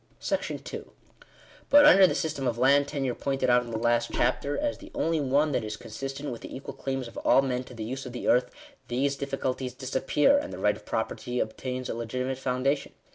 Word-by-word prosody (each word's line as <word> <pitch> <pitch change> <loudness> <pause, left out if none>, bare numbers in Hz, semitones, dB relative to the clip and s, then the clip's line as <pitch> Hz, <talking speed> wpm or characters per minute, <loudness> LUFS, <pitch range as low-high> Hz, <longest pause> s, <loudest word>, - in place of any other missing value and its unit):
§2 - - -3 0.8
But, 290 0 +8
under 190 0 +8
the - - -1
system 150 -4 -2
of 120 -1 -1
land 140 +3 +4
tenure 135 -4 -2
pointed 135 -1 0
out 125 0 +5
in 120 - -8
the 115 - -3
last 120 +1 +1
chapter, 145 +1 0
as 295 -1 -1
the 310 - -12
only 165 -1 +1
one 145 +2 +2
that 125 - 0
is 105 0 -5
consistent 135 +5 -6
with 120 - -7
the - - -8
equal 135 - -7
claims 135 -2 -3
of 115 - -12
all 135 - +4
men 125 -1 -1
to 125 - -12
the 110 - -5
use 130 +4 -5
of - - -7
the 120 - -5
earth, 125 +1 +4 0.4
these 135 +3 0
difficulties 130 -2 -3
disappear; 140 - +2
and 290 0 -6
the - - -6
right 105 0 +2
of 105 - -15
property 125 +2 -2
obtains 130 +3 -3
a - - -3
legitimate 125 +3 -3
foundation. 135 +2 -1
130 Hz, 210 wpm, -27 LUFS, 120-140 Hz, 0.8 s, But